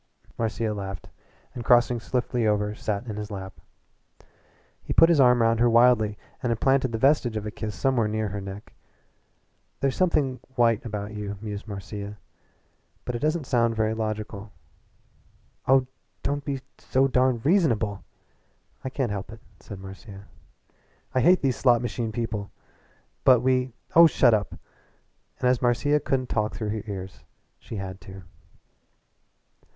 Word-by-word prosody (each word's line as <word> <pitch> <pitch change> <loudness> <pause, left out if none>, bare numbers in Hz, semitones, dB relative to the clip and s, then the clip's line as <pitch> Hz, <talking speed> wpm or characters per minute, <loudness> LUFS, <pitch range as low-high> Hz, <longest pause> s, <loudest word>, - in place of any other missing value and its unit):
Marcia 110 -1 -1
laughed, 95 -2 -6 0.4
and 120 - -6
crossing 120 +1 +4
swiftly 120 0 -1
over 105 0 +1
sat 105 +1 -3
in 110 -3 -6
his 105 0 -5
lap. 95 -2 -8 1.2
He - - -4
put 165 - +6
his 165 -4 +4
arm 125 -3 +5
round 115 0 +2
her 120 0 +4
wildly 115 -3 +4 0.2
and 125 - 0
implanted 130 +2 +2
the 115 - -2
vestige 130 -3 +2
of 105 - -4
a 105 - -4
kiss 105 -2 -5
somewhere 120 +5 +1
near 110 0 -2
her 100 +1 -5
neck. 100 +1 -9 1.1
"There's 135 -1 0
something 145 -8 +1 0.2
white 115 -2 +3
about 105 -2 -5
you," 105 -1 -5
mused 105 0 -6
Marcia 100 0 -7 0.9
"but 125 - -3
it 120 - -3
doesn't 155 0 0
sound 115 -3 +1
very 110 0 +1
logical." 110 -2 -4 1.2
"Oh, 130 0 +5 0.4
don't 145 0 -1
be 135 -2 -3 0.2
so 135 +1 +2
darned 130 -2 +1
reasonable!" 115 - +2 0.8
"I 130 - -3
can't 130 -4 -2
help 100 0 -5
it," 110 0 -12 0.2
said 100 - -9
Marcia. 95 +1 -11 0.9
"I 130 - +2
hate 180 +6 +4
these 130 -3 +1
slot 120 -3 +4
machine 120 -2 -3
people!" 110 -3 -3 0.7
"But 125 -3 +6
we 130 0 +1
" - - -28
"Oh, 170 0 +9
shut 125 -6 +4
up!" 105 -3 0 0.8
And 125 - +1
as 125 -1 +2
Marcia 135 +4 +2
couldn't 130 -2 -1
talk 105 -1 -1
through 110 -2 -3
her 110 0 -2
ears 95 -2 -7 0.4
she - - -9
had 95 -2 -6
to. 95 0 -11
115 Hz, 155 wpm, -25 LUFS, 105-130 Hz, 1.2 s, Oh